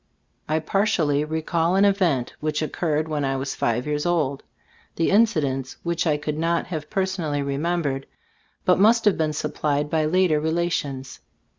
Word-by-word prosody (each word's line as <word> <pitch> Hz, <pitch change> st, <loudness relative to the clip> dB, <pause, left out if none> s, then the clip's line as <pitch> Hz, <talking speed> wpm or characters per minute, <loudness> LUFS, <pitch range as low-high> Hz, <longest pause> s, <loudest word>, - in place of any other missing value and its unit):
I 155 Hz, -, +2 dB
partially 160 Hz, -4 st, +1 dB
recall 160 Hz, +3 st, 0 dB
an 195 Hz, +1 st, +5 dB
event 180 Hz, -, +1 dB
which 155 Hz, 0 st, -1 dB
oc 155 Hz, -, -3 dB
curred 155 Hz, -2 st, -1 dB
when 150 Hz, -2 st, -2 dB
I 135 Hz, 0 st, 0 dB
was 135 Hz, +1 st, -3 dB
five 120 Hz, +2 st, -1 dB
years 150 Hz, 0 st, -1 dB
old; 155 Hz, -6 st, 0 dB, 0.5 s
the 165 Hz, -, +1 dB
incidents 150 Hz, -, +1 dB
which 170 Hz, 0 st, -1 dB
I 150 Hz, -2 st, +2 dB
could 150 Hz, +1 st, -4 dB
not 170 Hz, +1 st, +1 dB
have 155 Hz, -4 st, -5 dB
per 195 Hz, -, +1 dB
sonally 155 Hz, -7 st, -2 dB
remembered, 140 Hz, -1 st, -1 dB, 0.6 s
must 215 Hz, +5 st, +4 dB
have 210 Hz, -, +5 dB
been 155 Hz, -1 st, +1 dB
supplied 150 Hz, 0 st, -1 dB
by 155 Hz, -1 st, +2 dB
later 170 Hz, -1 st, +3 dB
relations. 155 Hz, -5 st, -2 dB
155 Hz, 160 wpm, -23 LUFS, 145-175 Hz, 0.6 s, an